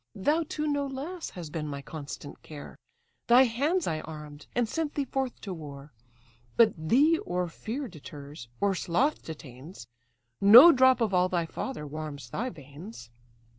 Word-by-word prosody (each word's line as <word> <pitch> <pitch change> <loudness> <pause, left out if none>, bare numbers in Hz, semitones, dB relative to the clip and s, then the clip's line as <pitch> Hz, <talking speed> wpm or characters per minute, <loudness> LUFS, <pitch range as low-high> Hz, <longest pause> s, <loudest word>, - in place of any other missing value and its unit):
Thou 295 - +1
too 305 - -3
no 285 -1 0
less 300 +6 -6
hast 170 -4 -9
been 155 -1 -4
my 140 -1 -6
constant 145 -1 -8
care; 150 -2 -10 0.5
Thy 245 +2 +7
hands 285 +9 0
I 155 - -1
arm'd, 150 -2 -10
and 240 -1 +1
sent 315 +4 -3
thee 285 - -1
forth 265 -1 -3
to 195 - -5
war: 145 -3 -10 0.6
But 225 -3 +6
thee 270 - +3
or 180 0 -2
fear 240 - -5
deters, 145 - -11
or 200 -1 +2
sloth 230 - 0
detains; 150 +1 -10 0.6
No 235 +12 +10
drop 260 -3 +4
of 215 -4 +1
all 180 0 +3
thy 175 -2 0
father 165 - -5
warms 145 -4 -7
thy 250 +4 -2
veins." 145 - -11
185 Hz, 160 wpm, -28 LUFS, -, 0.6 s, No